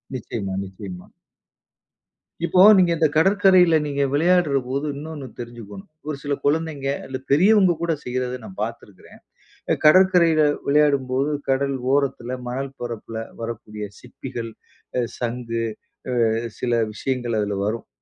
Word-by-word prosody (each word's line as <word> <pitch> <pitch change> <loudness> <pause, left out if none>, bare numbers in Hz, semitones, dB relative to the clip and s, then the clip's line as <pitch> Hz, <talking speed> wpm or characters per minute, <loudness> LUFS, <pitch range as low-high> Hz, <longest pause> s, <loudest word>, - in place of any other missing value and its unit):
நிச்சயமா 105 -5 -4
நிச்சயமா. 95 -2 -9 1.4
இப்போ 180 +1 +4 0.2
நீங்க 180 -2 +4
இந்த 160 -1 +4
கடற்கரையில 185 0 +5
நீங்க 140 -1 0
விளையாடுறபோது, 145 -5 +2
இன்னொன்னு 150 -1 -7
தெரிஞ்சுக்கோணும். 115 -5 -9 0.2
ஒரு 155 - -2
சில 145 -1 -1
குழந்தைங்க, 150 -2 0 0.2
இல்ல 130 0 -4
பெரியவங்க 190 +4 +5
கூட 170 -1 +1
செய்யிறத 125 0 -3
நான் 95 - -11
பாத்துருக்கிறேன். 105 -4 -9 0.5
அ - - +5
கடற்கரையில 170 -1 +6 0.2
விளையாடும்போது, 140 -2 +2 0.2
கடல் 135 +1 +1 0.2
ஓரத்துல, 130 -3 -1
மணல் 135 +2 -4
பரப்பில 115 -2 -6 0.2
வரக்கூடிய 110 -2 -6
சிப்பிகள், 120 -2 -7 0.5
ஆ - - +2 0.2
சங்கு, 115 -1 -3 0.5
ஆ - - -2 0.5
சில 120 - -1 0.2
விஷயங்கள் 120 0 -2
அதுல 100 -1 -2
வரும். 110 +2 -3
135 Hz, 115 wpm, -22 LUFS, 115-155 Hz, 1.4 s, கடற்கரையில